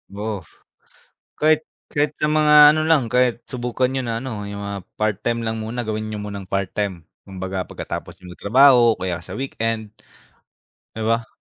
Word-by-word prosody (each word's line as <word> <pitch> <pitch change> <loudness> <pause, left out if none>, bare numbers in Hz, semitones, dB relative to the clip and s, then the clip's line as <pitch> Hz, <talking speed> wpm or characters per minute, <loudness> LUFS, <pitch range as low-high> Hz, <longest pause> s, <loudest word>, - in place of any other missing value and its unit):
Oo. 105 -1 -3 1.0
Kahit, 155 0 +3 0.2
kahit 145 0 0
sa 150 - +2
mga 150 0 +3 0.2
ano 155 - +1
lang, 155 -7 +3
kahit 125 0 +2
subukan 125 0 -1
niyo 130 0 -2
na 115 -1 -2
ano, 110 -6 -5
yung 100 0 -6
mga 100 0 -4 0.2
part 110 -2 +1
time 115 0 0
lang 115 -1 -2
muna 110 +3 -4
gawin 110 0 -2
niyo 105 - -4
munang 100 -1 -6
part 95 0 -2
time 95 -6 -3 0.2
kumbaga 95 -1 -4
pagkatapos - - -7
niyo 90 -1 -11
mag-trabaho 125 +1 +6
o - - -27
kaya 90 -2 -2
sa - - -10
weekend. 115 -5 -3 1.0
Di 110 - -5
ba? 115 +1 0
115 Hz, 175 wpm, -21 LUFS, 100-125 Hz, 1.0 s, mag-trabaho